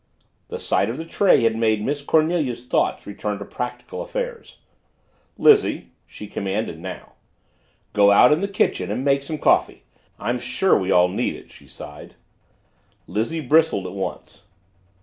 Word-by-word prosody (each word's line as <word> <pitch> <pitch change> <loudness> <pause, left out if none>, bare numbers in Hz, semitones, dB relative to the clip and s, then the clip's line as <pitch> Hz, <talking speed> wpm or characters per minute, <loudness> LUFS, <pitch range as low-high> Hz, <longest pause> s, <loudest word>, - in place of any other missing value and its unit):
The - - -6
sight 100 - 0
of 120 - -4
the 160 - -6
tray 180 - +3
had 115 -1 +2
made 110 -2 +1
Miss 145 +1 -2
Cornelia's 155 -5 0
thoughts - - 0
return 105 0 -4
to 100 - -8
practical 125 - -6
affairs. - - -6 0.8
"Lizzie," 420 -2 +3 0.2
she - - -10
commanded 100 -3 -3
now, - - -8 0.8
"go 100 -1 +5
out 125 +7 +6
in 155 - 0
the 200 - 0
kitchen 195 - 0
and 120 +6 -3
make 140 0 +3
some 155 +3 -5
coffee. - - +1 0.3
I'm 120 +4 -2
sure 125 +10 +1
we 95 - -1
all 90 -1 +5
need 90 - -2
it," - - -14
she - - -17
sighed. 75 -3 -11 0.9
Lizzie 115 - -2
bristled 155 -7 +2
at 90 - -6
once. 95 -1 -6
125 Hz, 155 wpm, -22 LUFS, 100-160 Hz, 0.9 s, out